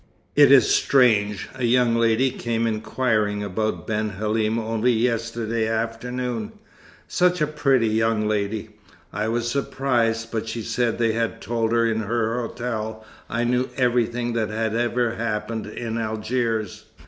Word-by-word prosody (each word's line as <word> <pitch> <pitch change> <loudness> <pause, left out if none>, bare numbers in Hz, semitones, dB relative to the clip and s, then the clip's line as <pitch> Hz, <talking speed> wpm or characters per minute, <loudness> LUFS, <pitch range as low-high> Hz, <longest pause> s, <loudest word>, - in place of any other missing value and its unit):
It 145 -2 +7
is 135 -4 +7
strange, 105 -7 +3
a 130 -1 -6
young 120 -1 +3
lady 115 +3 +3
came 115 -1 -2
inquiring 110 -2 0
about 110 +2 -2
Ben 110 0 -1
Halim 110 +2 -1
only 115 +2 +1
yesterday 115 -1 -1
afternoon; 115 +1 -3 0.5
such 180 0 +2
a 150 - +3
pretty 135 -6 +2
young 110 0 +1
lady. 105 +1 -2 0.4
I 105 +2 -1
was 120 +1 -1
surprised, 115 -4 0
but 115 -1 -3
she 110 0 -4
said 120 +1 0
they 115 -1 +2
had 115 0 -2
told 115 +1 -1
her 115 0 +3
in 110 -1 +1
her 115 +2 -1
hotel 110 -2 -4 0.2
I 115 +1 -1
knew 125 +1 +1
everything 120 -1 +1
that 110 -2 -1
had 110 0 -1
ever 120 0 0
happened 110 -1 -3
in 115 +1 -4
Algiers. 110 -1 -2
115 Hz, 145 wpm, -23 LUFS, 110-120 Hz, 0.5 s, It